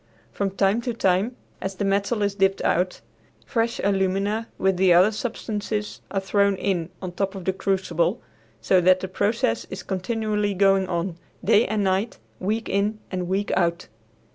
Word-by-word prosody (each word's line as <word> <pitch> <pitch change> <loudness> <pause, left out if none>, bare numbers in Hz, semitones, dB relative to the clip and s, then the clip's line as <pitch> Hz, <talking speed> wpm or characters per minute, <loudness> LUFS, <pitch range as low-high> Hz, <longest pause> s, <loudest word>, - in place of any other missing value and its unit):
From 200 -1 -1
time 195 +3 +1
to 235 -1 -3
time, 195 +4 +1 0.3
as 190 0 -3
the 200 - -2
metal 200 +3 +1
is 200 -1 +1
dipped 195 -1 +1
out, 180 +1 +1 0.4
fresh 230 -2 -1
alumina 200 +3 0
with 190 -1 +1
the 185 0 +4
other 185 +5 +6
substances 210 -2 -4
are 195 - -1
thrown 200 +1 +2
in 180 -3 -1
on 180 - -3
top 195 +2 -2
of 190 -2 -7
the 190 - +1
crucible, 185 -3 0 0.4
so 185 +10 +4
that 185 +1 +4
the 190 - -3
process 200 - 0
is 190 - -6
continually 210 +1 -1
going 195 0 +3
on, 170 -1 -2 0.3
day 220 +2 +5
and 215 -1 0
night, 195 +4 0 0.2
week 215 +4 -1
in 205 +2 0
and 180 -2 -2
week 195 +3 -1
out. 170 -1 0
195 Hz, 165 wpm, -24 LUFS, 185-210 Hz, 0.4 s, other